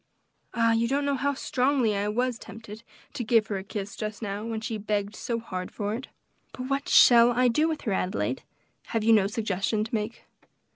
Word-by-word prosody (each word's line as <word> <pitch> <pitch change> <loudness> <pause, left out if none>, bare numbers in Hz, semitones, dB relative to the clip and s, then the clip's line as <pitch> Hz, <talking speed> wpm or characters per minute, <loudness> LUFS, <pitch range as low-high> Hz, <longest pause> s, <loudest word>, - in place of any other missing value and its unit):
Ah! 230 -1 +3
you 225 +1 +2
don't 280 +3 0
know 285 - +1
how 280 +1 0
strongly 255 -4 +1
I 200 +1 -1
was 245 +3 -1
tempted 220 -1 -10 0.3
to 245 - -3
give 225 -1 +3
her 200 -3 -3
a - - -8
kiss, 200 0 -6
just 215 -1 -5
now, 205 0 -4
when 225 -1 -3
she 225 0 -4
begged 205 0 -2
so 235 - -3
hard 185 -5 -5
for 205 -1 -3
it. 245 +4 -5 0.5
But 255 +1 -6
what 275 +1 -1
shall 235 -1 +7
I 250 +1 +3
do 300 +7 +2
with 315 -2 -3
her, 220 - -2
Adelaide? 185 0 -1 0.6
have 220 - -1
you 225 +1 +5
no 205 -3 +4
suggestion 210 0 -1
to 220 - -8
make?" 220 +1 -3
225 Hz, 205 wpm, -27 LUFS, 210-245 Hz, 0.6 s, shall